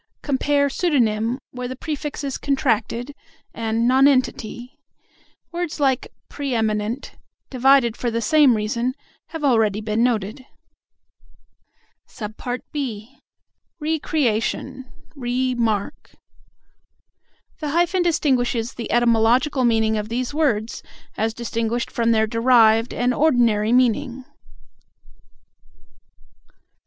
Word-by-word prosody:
Compare 285 0 +1
"pseudonym," 245 -7 +1
where 250 0 -5
the 260 - -6
prefix 295 +1 -5
is 275 -2 -3
contracted, 260 -2 -1 0.4
and 230 +1 -1
"nonentity." 255 -2 +1 0.7
Words 345 -2 -4
like 270 -3 0 0.2
"pre 280 -3 -4
eminent," 220 +3 -1 0.4
divided 260 -2 +4
for 240 - -2
the 230 0 -1
same 270 +2 +4
reason, 235 +4 -2 0.3
have 325 -2 -7
already 225 -6 +2
been 215 +1 0
noted. 230 +1 -1 2.3
(b) 250 -4 -5 0.6
"Re 315 +1 -1
creation," 260 -1 -2 0.2
"re 255 -1 -1
mark." 220 -4 -2 1.4
The 300 - -3
hyphen 345 +4 +1
distinguishes 250 -8 0
the 235 - -6
etymological 240 +4 +3
meaning 220 -2 +2
of 210 0 -4
these 245 +3 -3
words 235 -8 0 0.3
as 220 +1 -1
distinguished 235 0 -2
from 230 -1 0
their 220 -1 +3
derived 230 0 +4
and 245 +1 0
ordinary 235 -7 +2
meaning. 250 +1 +1
245 Hz, 100 wpm, -22 LUFS, 225-275 Hz, 2.3 s, divided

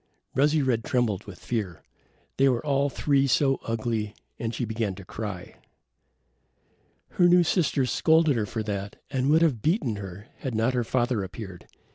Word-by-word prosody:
Rosy 150 +3 +3
red 120 -4 +1
trembled 115 -6 0
with 100 -4 -10
fear. 100 -8 -4 0.5
They 135 0 +5
were 125 +2 -1
all 140 -1 +2
three 140 0 +2
so 135 +1 +2
ugly, 110 -2 -2 0.2
and 115 -1 -2
she 120 +2 -2
began 110 -3 -2
to 95 -1 -11
cry. 100 -3 -7 1.5
Her 175 - +3
new 175 0 +6
sisters 150 - +1
scolded 160 -3 +4
her 110 -3 -1
for 110 +2 -3
that 100 -1 -4 0.2
and 130 0 0
would 160 +2 +5
have 135 -10 +2
beaten 145 - +1
her 100 0 -8
had 130 -4 -4
not 115 +4 +2
her 125 -1 +1
father 120 -2 0
appeared. 95 -2 -8
120 Hz, 165 wpm, -26 LUFS, 105-140 Hz, 1.5 s, new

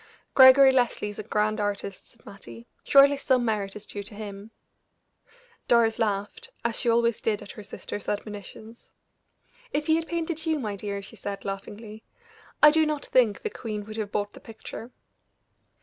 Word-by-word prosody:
"Gregory 265 0 +8
Leslie 245 -5 +1
is 205 - -11
a - - -4
grand 215 0 0
artist," 200 -1 -4
said 230 - -24
Mattie. 120 -12 -12 0.2
"Surely 280 0 +6
some 260 -3 +1
merit 205 -3 -2
is 210 0 -9
due 205 - -7
to 205 +1 -9
him." 205 0 -8 1.2
Doris 230 -2 +3
laughed, 210 - -2 0.2
as 235 -1 0
she 240 - +1
always 235 -1 +2
did 215 -2 -1
at - - -10
her - - -10
sister's 205 0 -7
admonitions. 210 +2 -7 0.8
"If 295 +1 -1
he 315 +1 +3
had 330 0 -4
painted 330 -2 -3
you, 315 -1 +2
my 215 -7 -3
dear," 200 0 -5
she 195 - -11
said, 200 -1 -6
laughingly, 210 +2 -7 0.6
"I 300 - +10
do 320 +1 +3
not 305 -2 -2
think 235 -5 +2
the 435 - -3
queen 210 - -5
would 215 +1 -8
have 210 -2 -4
bought 205 0 -2
the - - -12
picture." 225 +1 -9
220 Hz, 175 wpm, -26 LUFS, 205-260 Hz, 1.2 s, I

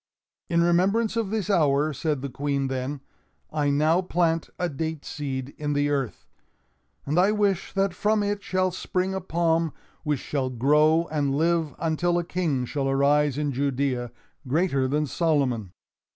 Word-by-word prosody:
"In 170 -1 +3
remembrance 195 +7 +2
of 225 -4 -1
this 215 -3 -2
hour," 150 -5 +2
said 140 0 -2
the 140 - -3
Queen 140 0 -1
then, 130 +2 -3 0.5
"I 150 -2 +1
now 155 +5 +3
plant 165 -2 0
a 180 - 0
date 160 0 -4
seed 135 -4 -4
in 145 -1 -1
the 145 0 +1
earth, 135 -5 -2 0.8
and 150 +5 +1
I 190 +3 +4
wish 200 -3 0
that 195 -1 +1
from 210 +3 +1
it 205 0 -1
shall 185 -1 0
spring 185 +1 -2
a 190 - -2
palm 165 -2 +1 0.3
which 150 -4 -1
shall 135 -1 -2
grow 150 +6 +3
and 145 -3 0
live 160 -2 +1
until 170 +2 0
a 175 - 0
King 165 -7 -1
shall 135 +1 -2
arise 140 +1 +2
in 150 -1 0
Judea, 130 -2 -1 0.4
greater 140 -2 +1
than 150 +3 0
Solomon." 135 - 0
150 Hz, 160 wpm, -25 LUFS, 140-175 Hz, 0.8 s, I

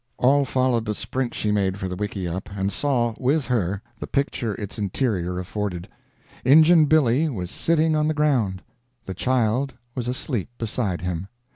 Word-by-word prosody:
All 140 +3 +4
followed 130 -3 +1
the 105 -1 -2
sprint 130 0 -3
she 105 - 0
made 100 -2 +1
for 95 - -4
the 90 - -4
wickieup, 95 -2 -4
and 95 +1 0
saw, 120 -5 +1
with 135 +3 +1
her, 100 -5 -1 0.2
the - - -5
picture 130 -6 -1
its 105 +1 -6
interior 95 -4 -1
afforded. 90 -1 -4 0.6
Injun 155 +4 +7
Billy 150 0 +3
was 90 -9 -4
sitting 160 -1 +2
on 150 0 +2
the 155 - 0
ground; 120 -11 +1 0.4
the 95 - -4
child 125 +4 0 0.2
was 125 -3 -3
asleep 125 - -2
beside 105 -6 -2
him. 90 +1 -3
115 Hz, 160 wpm, -24 LUFS, 95-135 Hz, 0.6 s, Injun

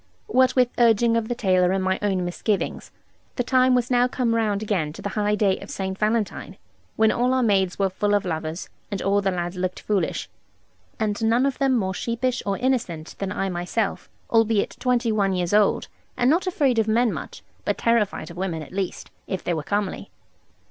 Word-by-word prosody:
What 255 +1 +3
with 250 -2 +4
urging 230 0 +4
of 230 -1 0
the 240 - -2
tailor, 185 -5 +2
and 190 0 0
my 190 0 0
own 190 -3 0
misgivings, 195 +3 -2 0.5
the 245 - 0
time 255 0 +3
was 245 0 0
now 245 0 +4
come 250 -2 0
round 215 -2 0
again 185 -8 -1
to - - -10
the 205 - -2
high 210 +1 0
day 200 -3 +1
of - - -10
St. 190 -1 -3
Valentine, 215 -3 -1 0.4
when 220 0 +4
all 250 +2 +1
our 260 - +2
maids 195 -5 +2
were 195 -1 +1
full 205 +2 +1
of 205 - 0
lovers, 160 0 -4 0.2
and 200 - -3
all 200 +1 +2
the 195 - +1
lads 175 0 -3
looked 185 0 -2
foolish. 205 -3 -1 0.7
And 215 0 -1
none 230 +4 +3
of 275 -2 -1
them 270 -2 +3
more 190 -4 -1
sheepish 235 +5 -1
or 195 -1 0
innocent 225 -12 -1
than 195 -1 -3
I 195 -1 -1
myself, 180 +4 -2 0.2
albeit 225 -2 +2
twenty 245 -2 +1
one 200 -3 +1
years 180 0 -1
old, 210 -1 +3 0.3
and 245 +2 +3
not 350 +4 +1
afraid 280 -9 +2
of 220 - +1
men 230 +1 +2
much, - - -8 0.2
but - - -1
terrified 230 -6 0
of 170 - -12
women, 175 -4 -3
at - - -13
least, 190 -1 -4 0.2
if 190 - -3
they 175 - 0
were 160 - -2
comely. 205 +5 -2
210 Hz, 205 wpm, -24 LUFS, 190-235 Hz, 0.7 s, with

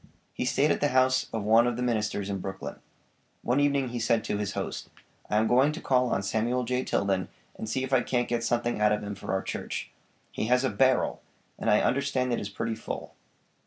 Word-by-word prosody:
He - - -2
stayed - - +2
at - - 0
the - - +4
house 130 0 +3
of 110 -2 -3
one 115 +3 +5
of 120 - 0
the 125 - -1
ministers 105 -4 -1
in 100 -1 -3
Brooklyn. 95 +1 -6 0.7
One 125 +3 +2
evening 140 -2 +2
he 120 0 -4
said 115 -1 +2
to 105 - -2
his 100 -1 -2
host: - - -4 0.4
"I 105 - +2
am 110 - +3
going 130 +6 +4
to 160 - -6
call 125 -5 +2
on 100 - 0
Samuel 115 +5 0
J. 125 +2 -1
Tilden 95 -5 0 0.3
and 110 - -6
see 130 +4 -1
if 130 0 -4
I 130 - +5
can't 120 -1 0
get 120 -1 -1
something 120 -1 0
out 105 0 +5
of 105 - 0
him 100 0 -4
for 100 - -6
our 95 0 0
church. - - -5 0.4
He 110 - -2
has 125 +2 +3
a 130 - +1
'barrel,' 130 -1 +2 0.4
and - - 0
I 105 - +5
understand 130 -2 +1
it - - 0
is 100 - -5
pretty 115 +3 -3
full." - - -6
120 Hz, 230 wpm, -28 LUFS, 105-125 Hz, 0.7 s, one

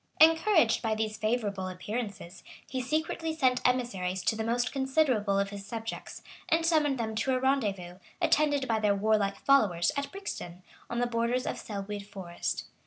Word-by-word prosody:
Encouraged 320 - +5
by 220 -1 0
these 215 0 -2
favorable 215 -4 -1
appearances, 195 -1 -5 0.2
he 260 - -3
secretly 315 +4 -2
sent 255 -5 +2
emissaries 195 -8 -1
to 220 - +1
the 220 - -2
most 240 +2 0
considerable 265 -7 +1
of 200 0 0
his 200 -1 -7
subjects, 225 +2 -6 0.3
and 325 0 +2
summoned 305 -5 +3
them 220 -2 -2
to 255 +4 0
a - - +1
rendezvous, 200 -10 -1 0.2
attended 290 -3 +2
by 225 -1 +1
their 210 -2 +2
warlike 200 -1 +1
followers, 200 -12 +4
at 280 0 -3
Brixton, 185 - -7 0.3
on 235 - -3
the 245 - +2
borders 240 +1 0
of - - -3
Selwood 205 -1 -6
Forest. 185 -4 -4
225 Hz, 165 wpm, -29 LUFS, 200-265 Hz, 0.3 s, Encouraged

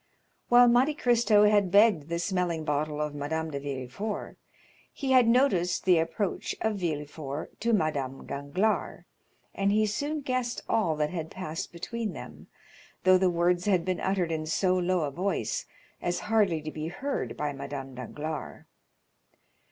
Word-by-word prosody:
While 245 0 +7
Monte 255 +5 +4
Cristo 235 -5 +4
had 205 -2 +4
begged 200 -6 +4
the 170 - -1
smelling 175 -3 -1
bottle 150 0 -1
of 150 -1 -2
Madame 160 +2 -3
de 140 - -3
Villefort, 140 - -5 0.6
he 270 -2 -3
had 255 -3 +6
noticed 230 -8 +2
the 180 -3 +5
approach 165 +5 -2
of 220 -2 0
Villefort 150 -3 -4
to 235 +2 0
Madame 145 - -1
Danglars, 160 +10 -1 0.5
and 195 0 +1
he 215 +1 +3
soon 290 +9 -2
guessed 255 -2 -2
all 180 -8 +1
that 150 0 -1
had 165 -3 -4
passed 165 -4 -5
between 220 +6 -4
them, - - -10 0.6
though 185 0 +6
the 185 -1 +3
words 175 +1 +1
had 185 -5 +2
been 185 -1 -1
uttered 190 -3 0
in 155 -1 -2
so 180 +4 +2
low 180 0 +1
a 145 -2 -1
voice 185 +7 -2 0.3
as 175 0 -1
hardly 205 -8 +1
to 155 - -5
be 155 +1 -5
heard 275 +11 -4
by 150 -1 -2
Madame 140 -1 -6
Danglars. 150 +5 -6
175 Hz, 155 wpm, -28 LUFS, 155-210 Hz, 0.6 s, While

